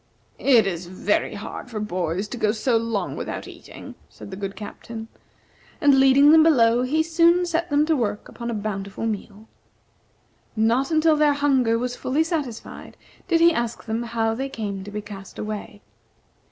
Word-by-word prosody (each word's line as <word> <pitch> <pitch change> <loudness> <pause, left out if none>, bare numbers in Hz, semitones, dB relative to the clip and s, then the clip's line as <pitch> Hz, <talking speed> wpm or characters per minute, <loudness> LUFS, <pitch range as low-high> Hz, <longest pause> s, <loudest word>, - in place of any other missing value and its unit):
"It 240 -6 +5
is 175 -2 -3
very 185 +4 -1
hard 210 +4 -7
for 220 -3 -5
boys 185 -1 -2
to 245 - -6
go 215 -2 +1
so 230 +2 0
long 225 -2 -1
without - - -5
eating," - - -11 0.2
said - - -12
the - - -5
good 195 0 -5
Captain. 220 +2 -8 0.7
And 285 -5 +5
leading 270 +2 +6
them 320 0 +7
below, 245 -7 +4
he 300 +5 +1
soon 335 +2 +3
set 340 0 -1
them 290 +1 +3
to 320 0 +2
work 210 -6 -2
upon 235 -1 -7
a 235 - -2
bountiful 200 0 -4
meal. 215 0 -5 1.1
Not 230 +5 +2
until 315 -1 +3
their 300 -1 +3
hunger 265 -5 +2
was 245 +1 -3
fully 280 +6 0
satisfied 295 -9 -5 0.3
did 335 -2 +2
he 340 0 +6
ask 235 -3 -3
them 225 +1 -2
how 225 -1 -1
they 270 +4 -4
came 200 -6 -5
to - - -8
be 210 +1 -5
cast 195 -2 -10
away. 210 -1 -6
230 Hz, 175 wpm, -23 LUFS, 210-290 Hz, 1.1 s, them